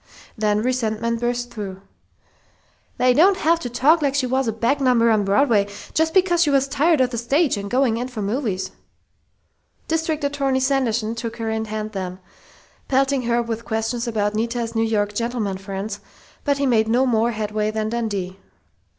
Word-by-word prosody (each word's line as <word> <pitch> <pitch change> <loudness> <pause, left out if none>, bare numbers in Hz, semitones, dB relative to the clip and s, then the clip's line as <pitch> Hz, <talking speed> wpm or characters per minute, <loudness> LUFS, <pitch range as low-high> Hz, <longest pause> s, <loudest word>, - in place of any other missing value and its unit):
Then 210 -1 +1
resentment 230 -2 -1
burst 245 0 -2
through: 195 -4 -6 1.2
"They 250 0 +4
don't 370 +8 +5
have 330 0 +2
to 245 - -5
talk 290 +7 +3
like 280 -2 +1
she 280 -2 +1
was 260 0 0
a - - +1
back 235 +6 0
number 240 -3 +4
on 215 -2 +3
Broadway, 205 0 +3 0.3
just 320 +2 +1
because 360 -2 +4
she 320 - +4
was 275 -1 +3
tired 295 +3 +2
of 250 -1 +2
the 235 - -2
stage 275 +5 +2
and 200 0 -5
going 245 -2 +2
in 245 +2 -3
for 235 -5 -5
movies!" 205 -3 -2 1.2
District 320 -1 -1
Attorney 280 -2 0
Sanderson 245 -5 0
took 230 0 -5
her 225 -1 -2
in 220 0 -2
hand 215 0 -4
then, 185 -3 -5 0.7
pelting 270 0 +2
her 240 0 +2
with 230 0 -4
questions 225 +2 -2
about 210 -2 0
Nita's 230 +1 -2
New 225 - 0
York 210 -2 0
"gentlemen 225 -4 -2
friends," 195 +1 -5 0.4
but 285 -1 +1
he 280 - 0
made 225 -4 +3
no 245 +4 +3
more 230 -2 +2
headway 215 0 -1
than 215 0 -2
Dundee. 200 -5 -3
235 Hz, 175 wpm, -22 LUFS, 215-270 Hz, 1.2 s, don't